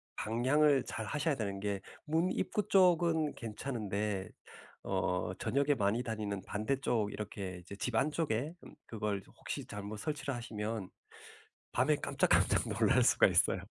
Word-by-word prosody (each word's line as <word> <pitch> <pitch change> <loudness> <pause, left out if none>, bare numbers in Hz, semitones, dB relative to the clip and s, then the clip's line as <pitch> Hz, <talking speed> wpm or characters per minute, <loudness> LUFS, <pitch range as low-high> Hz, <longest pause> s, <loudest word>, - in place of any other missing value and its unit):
방향을 135 +5 +3
잘하셔야 145 +8 -1
되는 100 -5 -3
게 100 -1 -2 0.2
문 165 +4 +1
입구 210 0 -1
쪽은 170 -5 +4
괜찮은데 105 -4 -3 0.5
어 90 0 -1
저녁에 140 +5 +1
많이 105 +1 +1
다니는 105 -4 -3
반대쪽 110 -1 -1
이렇게 100 -3 -5
이제 90 +3 -10
집 110 +4 -3
안쪽에 150 +1 0
음 - - -12
그걸 105 -3 -2 0.2
혹시 - - -5
잘못 105 +1 -6
설치를 145 +4 -3
하시면 110 -4 -4 0.8
밤에 - - +3
깜짝깜짝 - - +2
놀랄 - - +3
수가 - - +6
있어요. - - +3
110 Hz, 290 characters per minute, -33 LUFS, 105-145 Hz, 0.8 s, 수가